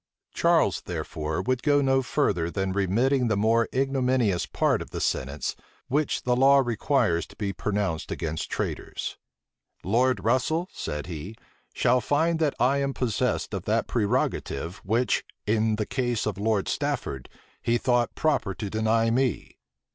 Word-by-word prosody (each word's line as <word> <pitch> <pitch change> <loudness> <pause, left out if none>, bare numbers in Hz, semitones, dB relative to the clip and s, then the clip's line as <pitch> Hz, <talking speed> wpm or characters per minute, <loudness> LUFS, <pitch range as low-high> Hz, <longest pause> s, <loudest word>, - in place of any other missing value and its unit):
Charles, - - +3
therefore, 80 +3 -3
would 130 +3 0
go 145 -1 +3
no 135 -1 +3
further 100 - 0
than 95 +1 -2
remitting 120 +7 +2
the 110 -3 +1
more 115 +2 +3
ignominious 130 -7 +1
part - - +1
of - - -7
the - - -5
sentence 70 +3 -2 0.3
which 145 +2 0
the 125 0 +2
law 135 +2 +6
requires 120 - +1
to - - -16
be 100 -2 -3
pronounced 100 -7 -2
against 80 -1 -3
traitors. - - -4 0.6
"Lord 115 +1 +2
Russel," 130 - +1
said 75 0 -4
he, 90 +5 -7 0.4
"shall 125 +1 +3
find 160 +7 +1
that 155 -3 +1
I 135 +3 +3
am 140 -1 -1
possessed 120 -5 -1
of - - -4
that - - +1
prerogative 100 - -1
which, 115 +5 0 0.2
in 110 +1 +2
the 105 0 -2
case 120 -2 -1
of 100 -3 -3
Lord 105 -1 +1
Stafford, 65 -2 -2 0.3
he 120 0 +2
thought 120 -1 +1
proper 145 -11 0
to 105 -3 -5
deny 110 +1 +2
me." 125 0 -1
115 Hz, 150 wpm, -26 LUFS, 100-130 Hz, 0.6 s, law